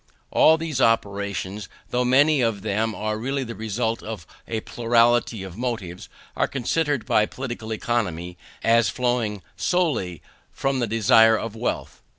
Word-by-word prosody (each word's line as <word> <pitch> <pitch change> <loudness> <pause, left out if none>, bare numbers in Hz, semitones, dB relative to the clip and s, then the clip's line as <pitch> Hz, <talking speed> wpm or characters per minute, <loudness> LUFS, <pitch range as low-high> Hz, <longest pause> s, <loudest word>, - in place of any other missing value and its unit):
All 160 +1 +6
these 155 -5 -3
operations, 100 -3 0 0.2
though 125 0 +1
many 140 +3 +4
of 115 -4 0
them 110 +1 -1
are 110 0 -2
really 135 +3 -2
the 115 -2 -6
result 110 +1 -2
of 105 -7 -7 0.2
a 110 -1 -2
plurality 115 -2 +2
of 95 0 -9
motives, 105 -8 -4 0.3
are - - +1
considered 145 +1 -1
by 105 0 +3
Political 120 -4 -6
Economy 90 -7 -2 0.3
as 115 -2 +4
flowing 120 -5 -1
solely 135 - 0 0.3
from 135 -1 -1
the 120 - 0
desire 115 +1 +5
of 115 0 -5
wealth. 115 +2 -4
115 Hz, 145 wpm, -24 LUFS, 105-125 Hz, 0.3 s, All